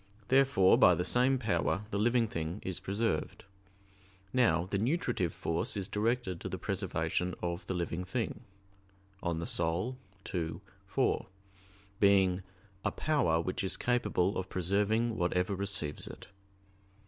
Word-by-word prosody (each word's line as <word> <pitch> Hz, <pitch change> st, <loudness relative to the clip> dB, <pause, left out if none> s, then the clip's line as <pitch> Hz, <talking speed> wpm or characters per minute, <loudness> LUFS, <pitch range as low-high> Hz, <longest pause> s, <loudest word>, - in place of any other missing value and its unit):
Therefore 130 Hz, -8 st, +5 dB
by 90 Hz, -, +7 dB
the 90 Hz, -, -1 dB
same 130 Hz, +4 st, +3 dB
power 105 Hz, -3 st, 0 dB
the 100 Hz, -, -1 dB
living 120 Hz, +1 st, +3 dB
thing 85 Hz, 0 st, -4 dB
is 95 Hz, -2 st, -2 dB
preserved. 100 Hz, -5 st, -2 dB, 0.9 s
Now 90 Hz, -9 st, +3 dB
the 100 Hz, +1 st, -2 dB
nutritive 120 Hz, -, 0 dB
force 85 Hz, +7 st, -2 dB
is 95 Hz, -2 st, -2 dB
directed 105 Hz, -4 st, -1 dB
to -, -, -4 dB
the 95 Hz, -, -4 dB
preservation 90 Hz, -3 st, -1 dB
of 85 Hz, +1 st, -3 dB
the 95 Hz, -, -2 dB
living 85 Hz, 0 st, -2 dB
thing 110 Hz, +3 st, -3 dB, 0.8 s
(De -, -, -3 dB
Anima 85 Hz, -1 st, -1 dB, 0.9 s
ii, 80 Hz, -2 st, -2 dB, 0.3 s
4), 115 Hz, +7 st, 0 dB, 0.7 s
being 95 Hz, -2 st, +4 dB, 0.4 s
"a -, -, +2 dB
power 140 Hz, -, +1 dB
which 95 Hz, +3 st, -3 dB
is 95 Hz, -, +2 dB
capable 105 Hz, -7 st, +1 dB
of 95 Hz, 0 st, -5 dB
preserving 105 Hz, +5 st, +1 dB
whatever 90 Hz, +2 st, +1 dB
receives 95 Hz, -6 st, -2 dB
it." -, -, -10 dB
95 Hz, 135 wpm, -32 LUFS, 90-115 Hz, 0.9 s, by